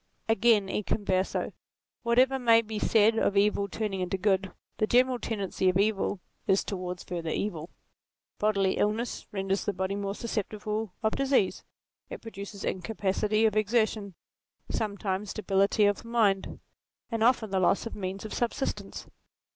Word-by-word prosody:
Again, 225 -2 +4
e 200 - -1
converse, 190 -2 -1 0.5
whatever 255 +3 +3
may 230 -2 +5
be 215 -1 -5
said 220 +1 +4
of 200 - +1
evil 200 0 +3
turning 200 -2 -3
into 180 +1 -1
good, 190 -1 +1 0.3
the 215 - +1
general 250 +1 +3
tendency 195 -4 -1
of 180 - +2
evil 200 -1 +1 0.3
is 195 0 +3
towards 180 -2 -5
further 170 -2 -4
evil. 170 -2 -3 0.7
Bodily 200 -3 +2
illness 220 +4 -1
renders 195 -1 -1
the 205 - 0
body 190 +1 -2
more 200 0 -3
susceptible 215 -2 -3
of 220 - +1
disease; 270 -8 +1 0.5
it - - -6
produces 200 -2 -8
incapacity 210 +2 0
of 215 -1 +2
exertion, 215 -2 +1 0.6
sometimes 200 -2 -2
debility 200 0 +2
of 205 0 +1
mind, 220 -5 +1 0.5
and 225 -1 0
often 230 -3 +3
the 190 - +1
loss 185 +4 +2
of 230 - -5
means 195 0 -5
of 215 - -6
subsistence. 240 +3 -3
205 Hz, 145 wpm, -28 LUFS, 195-225 Hz, 0.7 s, may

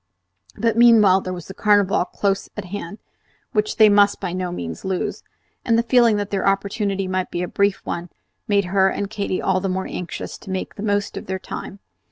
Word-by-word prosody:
But 230 +1 +1
meanwhile 215 -5 +6
there 185 - -5
was 175 -2 -6
the 190 - -8
Carnival 205 -2 +3
close 195 +1 -1
at 210 - -4
hand, 200 0 -6 0.5
which 210 -2 0
they 215 - +7
must 205 0 +4
by 175 - -4
no 180 -1 -3
means 85 - -6
lose; 190 -1 -2 0.4
and 230 -1 +2
the 230 - +2
feeling 235 -3 +4
that 205 -1 -3
their 195 -1 0
opportunity 195 0 0
might 185 0 -2
be 175 - -3
a - - -2
brief 200 +2 +1
one 175 +1 -4 0.4
made 200 -2 +2
her 190 +1 +3
and 200 +1 -4
Katy 200 -3 -2
all 190 -1 +2
the 195 +1 -2
more 190 +1 -2
anxious 180 - -6
to - - -12
make 190 0 -3
the - - -9
very 205 -1 +1
most 205 0 -3
of - - -7
their 190 0 -2
time. 190 - -7
195 Hz, 215 wpm, -21 LUFS, 185-205 Hz, 0.5 s, they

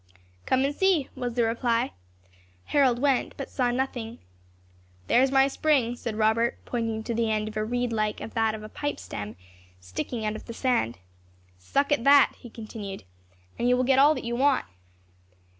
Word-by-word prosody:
"Come 260 +1 +3
and 280 - -1
see," 350 -5 +2
was 245 -3 -4
the 240 - +2
reply. 230 +1 0 0.7
Harold 265 -4 +3
went, 270 0 0
but 275 - -6
saw 250 -2 +1
nothing. 240 -2 -3 0.9
"There 245 - +4
is 265 0 +3
my 270 0 +5
spring," 275 -4 +1
said 230 -2 -5
Robert, 220 +2 +2
pointing 225 -2 -2
to 235 - -3
the 230 0 0
end 215 0 0
of 215 - -7
a 215 - 0
reed 245 +1 -1
like 215 -1 0 0.2
that 225 -1 +1
of 215 - -9
a - - -7
pipe 290 +5 -4
stem, 105 +1 -7 0.4
sticking 90 - -5
out 215 0 -1
of - - -9
the 230 - -8
sand. 230 - 0 0.6
"Suck 280 - 0
at 290 -5 +2
that," 280 0 +6
he 240 - -11
continued, 215 -3 -8 0.6
"and 240 - +2
you 250 - +4
will 255 - +2
get 265 +1 +3
all 295 +3 +6
that - - -5
you 235 0 -2
want." 270 +1 +2
240 Hz, 185 wpm, -26 LUFS, 220-265 Hz, 0.9 s, that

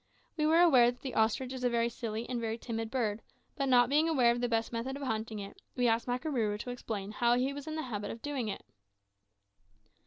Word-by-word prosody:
We 305 -1 +1
were 325 +2 +5
aware 260 -9 +6
that 245 0 -7
the 265 - -5
ostrich 230 +4 +1
is 255 -1 -6
a 245 - +3
very 235 -1 +1
silly 230 -1 -4
and 245 -2 -3
very 225 0 -2
timid 225 -1 -4
bird, 225 -4 -1 0.3
but 275 -2 -1
not 245 -1 +6
being 300 +5 +3
aware 255 -7 +4
of 240 0 -1
the 245 - 0
best 225 0 0
method 240 +4 -3
of 285 - -7
hunting 220 -3 -2
it, 200 -1 -8
we 245 -1 +2
asked 230 +1 +1
Makarooroo 245 -5 -1
to 250 - -5
explain 210 -5 -5
how 235 +2 +2
he 260 +3 0
was 285 +1 -8
in 310 - -4
the 315 - -2
habit 210 -5 -4
of 225 - -7
doing 280 -6 -2
it. 205 - -5
240 Hz, 235 wpm, -31 LUFS, 225-265 Hz, 0.3 s, aware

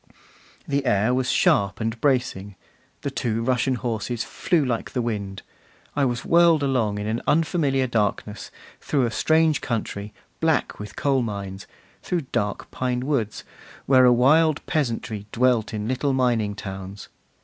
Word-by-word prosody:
The 140 0 -1
air 105 +5 +2
was 125 0 0
sharp 100 -1 +2
and 115 0 -3
bracing; 120 -8 0 0.5
the 140 - -3
two 115 -3 -1
Russian 130 +1 +1
horses 120 -1 -3
flew 165 -5 0
like 120 -3 -3
the 125 - 0
wind; 100 -4 -4 0.5
I 145 -1 +2
was 120 -1 -2
whirled 170 -3 +5
along 120 -7 +1
in 105 - -4
an 110 +2 -2
unfamiliar 150 -4 +2
darkness, 105 -2 -2 0.3
through 140 -4 0
a 115 - -2
strange 160 +5 +2
country, 105 -3 -3 0.3
black 160 -1 0
with 105 -1 -8
coal 135 -2 +1
mines, 100 -4 -5 0.3
through 175 -2 -1
dark 105 -4 -2
pine 125 -1 -1
woods, 120 -8 -1 0.4
where 130 -1 +6
a 125 - +7
wild 145 +5 +4
peasantry 115 -7 -2
dwelt 120 -2 +2
in 105 -1 -4
little 130 +3 0
mining 120 -5 +1
towns. 95 0 -7
120 Hz, 150 wpm, -24 LUFS, 105-135 Hz, 0.5 s, a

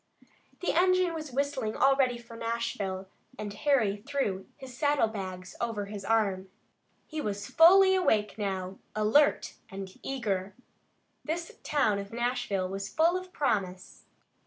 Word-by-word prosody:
The 360 - 0
engine 365 0 +3
was 310 -3 -6
whistling 265 -4 -1
already 270 -2 +3
for 235 -1 -12
Nashville, 230 -5 -3 0.3
and 205 -1 -5
Harry 220 -4 +2
threw 205 -6 -2
his 265 -3 -10
saddle 285 -2 +2
bags 185 -4 -6
over 225 -4 -2
his 200 -1 -7
arm. 195 -3 +1 0.6
He 310 -1 -5
was 205 -4 -3
fully 380 - +7
awake 220 - +2
now, 190 -2 -3 0.2
alert 220 +8 +3 0.2
and 195 -1 -7
eager. 200 -8 -2 0.7
This 335 +2 -4
town 220 -9 +1
of 200 0 -7
Nashville 240 -5 -1
was 195 +1 -5
full 330 +3 +3
of 370 0 -5
promise. 190 - -2
230 Hz, 135 wpm, -29 LUFS, 200-285 Hz, 0.7 s, fully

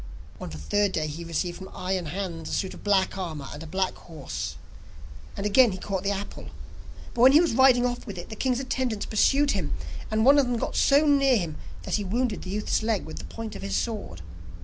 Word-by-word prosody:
On - - -6
the 80 - -8
third 205 - 0
day, 155 - 0
he 155 +3 -5
received 170 +1 -3
from 190 - -9
Iron 185 -2 -2
Hans 170 -1 -4
a - - -4
suit 190 - -1
of - - -12
black 195 -2 +2
armour 155 -7 -5
and 145 - -8
a 165 - -7
black 190 +3 0
horse, 155 -5 -6 0.8
and 200 - -3
again 220 +1 +5
he - - -5
caught 190 0 -3
the 200 - -1
apple. 200 - -5 0.7
But 235 - -1
when 260 +2 +8
he 300 - +8
was 340 -5 +2
riding 255 0 +5
off 245 0 -3
with 200 -3 -6
it, 175 - -7
the 220 - -6
king's 255 +1 0
attendants 260 -5 -2
pursued 275 +6 +3
him, 180 -8 -2 0.3
and 220 +1 +1
one 280 +2 +7
of 270 - +2
them 245 -1 0
got - - -3
so 285 +2 +4
near 275 -3 +4
him 170 -6 -3 0.3
that - - 0
he 205 - -3
wounded 225 +3 -1
the 185 - -8
youth's 210 +3 0
leg 220 -3 0
with 160 - -8
the - - -8
point 225 -1 -7
of - - -7
his 100 0 -2
sword. 200 - -3
205 Hz, 235 wpm, -26 LUFS, 175-245 Hz, 0.8 s, when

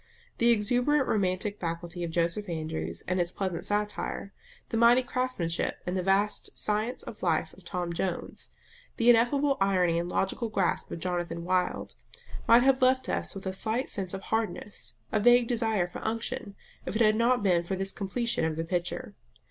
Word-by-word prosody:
The 235 - +4
exuberant 245 +6 +3
romantic 200 0 0
faculty 170 +1 -4
of 170 - -2
Joseph 170 +4 -1
Andrews 85 - -3
and 185 0 +1
its 175 0 -1
pleasant 185 -4 -3
satire; 205 -1 -2 0.4
the - - -3
mighty 235 +2 +6
craftsmanship 250 -10 -2
and 180 - -2
the 185 - 0
vast 195 +3 +1
science 215 +4 0
of - - -9
life - - 0
of - - -17
Tom 175 -2 -3
Jones; 175 +1 -3 0.5
the 240 +1 +6
ineffable 275 +5 +3
irony 180 -4 +3
and 175 +1 -3
logical 195 +5 -1
grasp 195 -5 0
of - - -5
Jonathan 175 -1 -3
Wild, 180 0 -1 0.5
might 235 +1 +7
have 265 0 +3
left 260 0 +3
us - - -1
with 195 - -7
a 190 - -2
slight 225 +6 -1
sense 195 -2 -3
of 190 - -6
hardness, 220 -2 -3 0.2
a 215 - +2
vague 240 +2 +5
desire 225 -6 +1
for 175 - -8
unction, 225 -1 -3 0.3
if 180 - -5
it 225 - +1
had 215 0 +4
not 235 0 +2
been 180 -4 +3
for 175 +3 -3
this 195 +1 -1
completion 230 +1 -1
of 160 -1 0
the 165 +1 -3
picture. 175 +1 -3
200 Hz, 180 wpm, -28 LUFS, 175-235 Hz, 0.5 s, might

